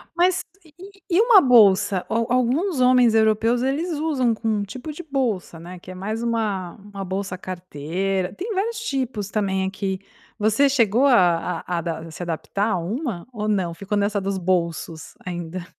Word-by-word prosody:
Mas 360 +1 +2 0.2
e 315 - -20
e 390 +2 -13 0.2
e - - +6
uma 460 -5 +7
bolsa? 200 -6 +5
Al 230 0 0
alguns 260 +7 +1
homens 250 -3 +5
europeus 220 +2 +3
eles 310 +6 -1
usam 275 -7 +1
com 225 - -5
um 210 -2 +1
tipo 250 +9 -7
de 350 - -7
bolsa, 245 - -2
né, 175 +1 -10
que 180 - -14
é 185 - -7
mais 215 +5 -4
uma 215 -6 -1
uma 200 -1 -9
bolsa 190 0 -3
carteira 185 +1 -3
tem 420 +5 -4
vários 430 +3 -1
tipos 255 - -3
também 190 -3 0
aqui. 190 0 -3 0.4
Você 220 +6 +3
chegou 250 0 +3
a 175 -7 +3
a 180 - -2
adap 165 -1 -5
se 160 - -9
adaptar 175 +5 -2
a - - +1
uma 200 - -4
ou 215 -2 -3
não, 190 -5 0
ficou 200 +4 -3
nessa 205 0 0
dos 195 0 -2
bolsos 170 -3 -2
ainda? 175 0 -5
210 Hz, 175 wpm, -23 LUFS, 185-255 Hz, 0.4 s, uma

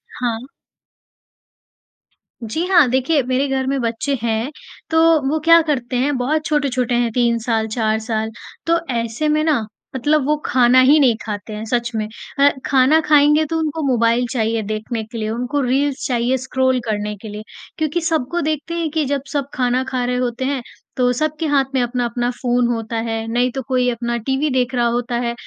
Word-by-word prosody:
हाँ। 240 0 -3 2.0
जी 315 +11 -2
हाँ, 340 -8 +5
देखिए, 265 +4 +2
मेरे 260 +2 +1
घर 265 -1 -1
में 275 0 0
बच्चे 235 +4 -1
हैं। 230 +3 -1 0.4
तो 320 - +1 0.3
वो 315 +2 0
क्या 335 0 +7
करते 255 -3 -1
हैं, 270 +3 +1
बहुत 305 +5 0
छोटे-छोटे 260 -5 0
हैं, 240 -1 +1
3 235 0 +2
साल, 225 -2 0
4 220 -1 0
साल। 220 0 -2 0.3
तो 335 +1 +3 0.2
ऐसे 235 +6 -1
में 305 +1 +2
ना 290 -9 +1 0.3
मतलब 295 +2 +1
वो 300 +2 +2
खाना 250 0 +4
ही 300 +2 +6
नहीं 250 -5 +4
खाते 210 -1 -5
हैं, 210 - -5
सच 240 +1 -1
में। 215 -1 -1 0.3
अ, 285 +1 +7 0.2
खाना 270 +4 +4
खाएँगे 300 0 +4
तो 325 - +1
उनको 315 0 -2
मोबाइल 235 -2 +2
चाहिए 225 -2 0
देखने 215 +2 -4
के 225 +2 -9
लिए, 215 -1 -2
उनको 250 +5 -2
रील्स 270 +2 0
चाहिए 245 +1 +1
स्क्रॉल 260 0 0
करने 210 -1 -2
के 220 - -8
लिए 210 +1 -7 0.3
क्योंकि 315 +2 -1
सबको 330 0 -1
देखते 310 +1 -2
हैं 335 -2 -1
कि 310 -1 0
जब 280 0 -1
सब 280 -2 -1
खाना 255 0 +1
खा 255 -1 -2
रहे 250 0 -1
होते 250 0 -2
हैं, 270 -2 -1 0.4
तो 250 -1 +3
सबके 310 +5 -2
हाथ 285 -2 +3
में 260 - +3
अपना-अपना 240 0 -1
फ़ोन 245 -1 +2
होता 230 -1 -3
है। 225 0 -2
नहीं 245 +2 +1
तो 265 - -2
कोई 250 -1 +1
अपना 235 0 -2
टीवी 270 +3 +1
देख 255 0 0
रहा 240 -1 +2
होता 240 +1 -1
है, 235 - -1
250 Hz, 190 wpm, -19 LUFS, 235-285 Hz, 2.0 s, क्या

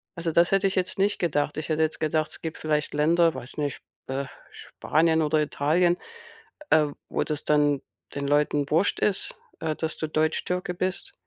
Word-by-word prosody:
Also, 170 -1 -2
das 170 +2 +4
hätte 195 0 +3
ich 190 - -2
jetzt 185 -1 0
nicht 200 +2 +2
gedacht. 150 -3 0
Ich 155 - -4
hätte 155 0 +1
jetzt 155 - -1
gedacht, 155 0 0
es - - -7
gibt 160 -1 -5
vielleicht 150 -1 -1
Länder, 165 +3 +3
weiß 130 0 -8
nicht, 145 -3 -2 0.3
äh, 135 +1 -2 0.3
Spanien 160 +1 +1
oder 155 0 +2
Italien, 165 +4 +2 0.7
äh, 155 -1 +5 0.2
wo - - 0
das 150 -2 -3
dann 145 -2 +3 0.3
den 140 0 -2
Leuten 145 0 +2
wurst 165 +6 +2
ist, 200 -2 0 0.2
äh, 155 -1 -2
dass 160 +1 -3
du 155 - -2
Deutschtürke 155 +4 -1
bist. 185 +1 -3
155 Hz, 180 wpm, -26 LUFS, 150-170 Hz, 0.7 s, äh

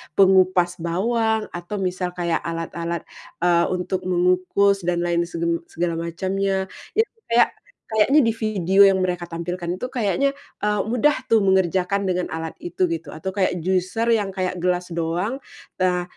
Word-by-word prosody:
pengupas 185 -2 +4
bawang, 220 +6 0
atau 175 +4 -6
misal 180 -2 -2
kayak 170 -2 0
alat-alat, 170 0 -4 0.4
eee, 170 -1 +4
untuk 185 +1 -3
mengukus 185 +2 +2
dan 175 -1 +1
lain 170 0 0
seben 170 0 -1
segala 170 0 -2
macamnya. 190 +3 -2 0.2
Itu 445 +1 +2 0.2
kayak, 235 +1 +4 0.4
kayaknya 220 +7 +4
di 230 -5 +3
video 200 -3 +3
yang 195 -1 +5
mereka 180 -1 -1
tampilkan 175 +1 -4
itu 250 - -3
kayaknya, 260 +3 0 0.2
eee, 210 0 0
mudah 260 +2 +2
tuh 225 - +6
mengerjakan 190 0 +2
dengan 180 -2 -1
alat 160 0 -4
itu, 175 +2 -3
gitu, 160 -3 -5
atau 165 +5 -4
kaya 185 -2 0
juicer 185 +6 0
yang 210 -3 +2
kaya 185 -1 -1
gelas 180 0 -1
doang, 170 +10 -2 0.4
eee, 180 -1 +2
185 Hz, 150 wpm, -22 LUFS, 175-200 Hz, 0.4 s, tuh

